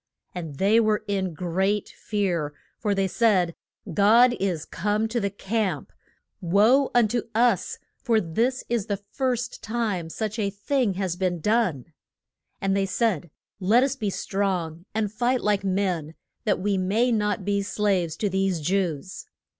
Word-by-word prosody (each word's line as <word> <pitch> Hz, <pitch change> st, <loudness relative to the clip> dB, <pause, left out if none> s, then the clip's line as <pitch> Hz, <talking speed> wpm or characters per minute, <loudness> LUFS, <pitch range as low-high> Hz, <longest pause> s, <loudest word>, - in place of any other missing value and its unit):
And 165 Hz, -5 st, -6 dB
they 205 Hz, +6 st, +4 dB
were 215 Hz, -2 st, +2 dB
in 190 Hz, -4 st, -1 dB
great 190 Hz, +4 st, 0 dB
fear; 175 Hz, -8 st, -2 dB, 0.2 s
for 205 Hz, -3 st, 0 dB
they 195 Hz, 0 st, +1 dB
said, 185 Hz, -3 st, +2 dB, 0.4 s
God 230 Hz, +6 st, +5 dB
is 180 Hz, -5 st, -1 dB
come 210 Hz, +4 st, -1 dB
to 235 Hz, +1 st, 0 dB
the 200 Hz, -2 st, 0 dB
camp! 200 Hz, -4 st, -2 dB, 0.5 s
Woe 215 Hz, +10 st, +4 dB
un 240 Hz, -2 st, +5 dB
to 240 Hz, +1 st, -2 dB
us, 230 Hz, -5 st, +2 dB, 0.2 s
for 230 Hz, -3 st, +3 dB
this 230 Hz, +9 st, 0 dB
is 235 Hz, -4 st, -1 dB
the 200 Hz, -, -1 dB
first 250 Hz, -3 st, -2 dB
time 215 Hz, -7 st, -2 dB
such 215 Hz, +5 st, -3 dB
a 200 Hz, -2 st, +1 dB
thing 205 Hz, +1 st, 0 dB
has 185 Hz, -2 st, -2 dB
been 180 Hz, -2 st, -1 dB
done! 175 Hz, -, 0 dB, 0.7 s
And 195 Hz, -1 st, 0 dB
they 195 Hz, -1 st, +1 dB
said, 185 Hz, -5 st, 0 dB, 0.3 s
Let 215 Hz, +6 st, +4 dB
us 275 Hz, 0 st, 0 dB
be 215 Hz, -7 st, -2 dB
strong 185 Hz, -4 st, -2 dB
and 215 Hz, -2 st, -1 dB
fight 245 Hz, +3 st, +1 dB
like 205 Hz, -2 st, +1 dB
men, 185 Hz, -5 st, -1 dB, 0.3 s
that 205 Hz, -4 st, +2 dB
we 195 Hz, 0 st, 0 dB
may 215 Hz, +7 st, +2 dB
not 210 Hz, -3 st, 0 dB
be 200 Hz, 0 st, +1 dB
slaves 195 Hz, -5 st, 0 dB
to 210 Hz, -, 0 dB
these 190 Hz, -2 st, 0 dB
Jews! 180 Hz, 0 st, -2 dB
200 Hz, 155 wpm, -25 LUFS, 185-220 Hz, 0.7 s, God